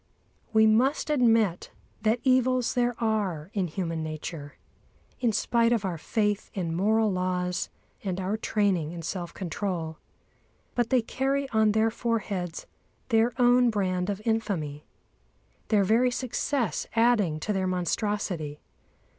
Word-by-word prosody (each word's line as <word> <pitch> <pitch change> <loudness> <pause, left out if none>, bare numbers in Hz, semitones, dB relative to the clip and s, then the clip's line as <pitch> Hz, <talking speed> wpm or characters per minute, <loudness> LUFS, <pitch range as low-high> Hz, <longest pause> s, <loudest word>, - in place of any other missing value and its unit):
We 220 0 +5
must 255 +8 +3
admit 225 - +2 0.3
that 225 +2 +1
evils 255 -1 +3
there 245 -1 +1
are 200 -8 -1
in 195 -4 0
human 165 -1 -3
nature, 155 -1 -6 0.6
in 240 -3 +2
spite 230 +2 +2
of 225 -4 +1
our 175 -4 -3
faith 210 +3 -1
in 170 -4 -2
moral 215 +3 +2
laws 180 -1 -1 0.3
and 190 -2 -2
our 190 +3 -1
training 195 -7 0
in 170 -1 -7
self 175 +1 -4
control. 170 -3 -4 0.7
But 240 -1 0
they 255 -3 +3
carry 275 +3 -1
on 220 -1 +3
their 220 +1 +3
foreheads 205 -7 -2 0.4
their 225 0 +3
own 245 0 +5
brand 185 -3 0
of 205 +1 -3
infamy, 185 -11 -2 0.8
their 210 -3 +3
very 230 +6 +3
success 250 - -1
adding 225 -9 +3
to 210 - -1
their 190 -1 0
monstrosity. 180 -4 -2
210 Hz, 130 wpm, -27 LUFS, 180-230 Hz, 0.8 s, We